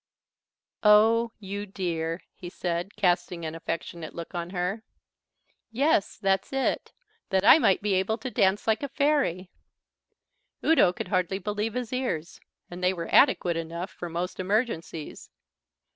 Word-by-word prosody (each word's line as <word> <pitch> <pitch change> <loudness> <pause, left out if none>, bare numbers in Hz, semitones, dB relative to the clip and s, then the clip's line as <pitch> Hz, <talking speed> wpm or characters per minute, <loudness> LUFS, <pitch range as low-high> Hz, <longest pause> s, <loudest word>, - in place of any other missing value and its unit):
"Oh, 225 +2 +5
you 200 0 -5
dear," 170 -3 -3
he 175 - -9
said, 175 +2 -3
casting 175 -2 0
an 160 - -4
affectionate 165 0 -5
look 170 +2 -7
on 170 -1 -4
her. 180 +4 -2 0.9
"Yes, 250 -3 +1
that's 195 -2 0
it. 270 0 -1 0.4
That 190 0 +1
I - - +9
might 195 -8 +3
be 205 -2 +1
able 190 +4 +1
to 250 +2 -6
dance 200 -3 +2
like 220 -1 +1
a 280 - -3
fairy." 275 - 0 1.1
Udo 315 - +5
could - - -6
hardly 185 -1 0
believe 210 +3 -3
his 250 -1 -3
ears, 210 -11 -3 0.3
and 175 +1 -9
they 180 +1 +3
were 170 -2 -6
adequate 180 - +4
enough 170 +3 -5
for 175 - -7
most 175 +3 -4
emergencies. 185 -6 -2
190 Hz, 145 wpm, -27 LUFS, 175-220 Hz, 1.1 s, I